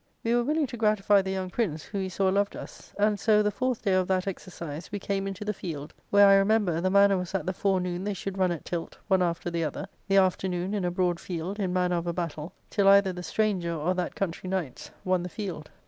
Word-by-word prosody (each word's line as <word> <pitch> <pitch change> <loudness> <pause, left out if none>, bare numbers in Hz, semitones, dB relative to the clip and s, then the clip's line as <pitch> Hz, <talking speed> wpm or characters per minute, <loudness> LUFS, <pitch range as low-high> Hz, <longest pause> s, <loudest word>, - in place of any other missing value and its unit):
We 230 - +1
were 240 0 +3
willing 300 +4 +1
to 245 -2 -7
gratify 210 -2 +3
the 190 - -5
young 190 -1 -3
prince, 175 -8 -1
who 200 - -5
we 190 -1 -2
saw 190 +1 +1
loved 200 +1 +1
us. - - -10
And 205 0 +2
so, 210 +1 +4
the 210 - +1
fourth 255 +3 -2
day 195 -3 +2
of 185 -1 +2
that 185 -1 +1
exercise, 170 -4 -6
we 205 - -2
came 195 0 -2
into 195 +2 -5
the 210 - -1
field, 155 -6 -6 0.2
where, 205 0 +7
I 195 0 +7
remember, 195 -4 +2
the 185 - +1
manner 200 0 +5
was 180 -1 -4
that 195 - -1
the 185 - -1
forenoon 180 -2 0
they 205 0 -2
should 195 +1 -5
run 185 -1 +3
at 170 - -5
tilt, 170 -2 -4
one 190 -2 +3
after 170 0 -1
the 170 -1 -1
other, 155 +5 -3 0.2
the 195 0 +3
afternoon 185 0 +1
in 200 -3 -1
a - - +1
broad 175 -1 0
field, 180 +3 -5
in 190 -3 0
manner 180 -1 +1
of 170 0 -3
a 170 - 0
battle, 165 -2 -4 0.2
till 200 -2 +2
either 195 -1 +6
the 180 - -6
stranger 180 -2 0
or 165 +4 0
that 180 -1 -3
country 185 -1 -3
knights 180 -9 -3 0.2
won 185 -1 +2
the 180 - -5
field. 180 -7 -6
190 Hz, 250 wpm, -27 LUFS, 175-200 Hz, 0.2 s, where